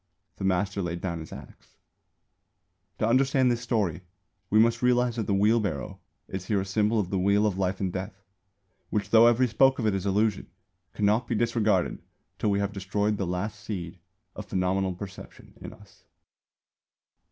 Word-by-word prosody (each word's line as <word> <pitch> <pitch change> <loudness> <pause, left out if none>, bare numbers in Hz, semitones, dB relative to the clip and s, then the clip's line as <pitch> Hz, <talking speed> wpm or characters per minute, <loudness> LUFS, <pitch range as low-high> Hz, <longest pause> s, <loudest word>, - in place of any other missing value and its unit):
The - - -6
master 95 +1 0
laid 85 -1 -3
down 85 -3 -3
his 80 - -9
axe. - - -13 1.2
To 110 - 0
understand 130 +1 +3
this 120 -1 -1
story 105 -9 -1 0.5
we 105 - +3
must 115 +1 +4
realise 125 -1 +2
that 110 - -2
the 100 - +1
wheel 105 +4 +4
barrow 90 -10 -4 0.3
is 95 -1 -6
here 105 -2 +1
a 95 - -2
symbol 105 +3 +1
of 95 -3 -2
the 95 - 0
Wheel 100 +3 +3
of 100 -3 -1
Life 95 0 -1
and 95 -2 -2
Death, 95 +1 -6 0.7
which, 105 -1 -2
though 115 +1 +7
every 120 +2 +4
spoke 130 +4 +3
of 115 - -2
it 105 - +2
is 95 0 -2
illusion, 105 +1 +1 0.5
cannot 105 +3 +1
be 115 - -1
disregarded 110 -5 +1 0.4
till 105 - +1
we 100 - +2
have 100 0 -2
destroyed 100 +2 -1
the 95 - -2
last 100 +4 -3
seed 90 -5 -6 0.4
of - - -8
phenomenal 95 0 0
perception 95 +1 -10
in - - -7
us. 105 -3 -18
100 Hz, 175 wpm, -27 LUFS, 95-110 Hz, 1.2 s, though